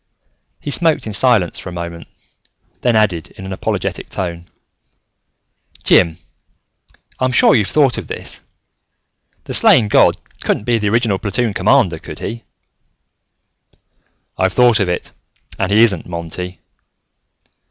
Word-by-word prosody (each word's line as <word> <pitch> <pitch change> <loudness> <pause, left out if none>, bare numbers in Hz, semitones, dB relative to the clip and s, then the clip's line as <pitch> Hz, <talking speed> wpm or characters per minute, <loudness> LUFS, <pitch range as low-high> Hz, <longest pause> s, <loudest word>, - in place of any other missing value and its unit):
He 145 - -5
smoked 160 -3 +2
in 110 - -5
silence 105 -5 +2
for - - -8
a - - -9
moment, 85 -1 -7 0.7
then 120 -2 +2
added, 95 -7 +1
in 95 - -9
an 95 - -5
apologetic - - -3
tone, 85 -2 -5 1.3
"Jim, 85 -2 +3 1.0
I'm 130 0 +1
sure 125 - +5
you've 105 -5 +2
thought 140 -5 +2
of - - -9
this: - - -6 1.0
the - - -7
slain 110 -5 +5
god - - +4 0.3
couldn't - - -1
be 120 0 +1
the 105 -1 0
original 110 -3 +1
platoon 115 +1 -1
commander, 95 -4 +2
could - - -9
he?" 115 +1 -6 1.9
"I've 95 0 +1
thought 120 -2 +4
of 100 -3 0
it, 90 - -3 0.5
and 100 - 0
he 110 +3 +5
isn't, 95 -8 +2
Monty. 90 +1 -6
100 Hz, 130 wpm, -17 LUFS, 90-120 Hz, 1.9 s, sure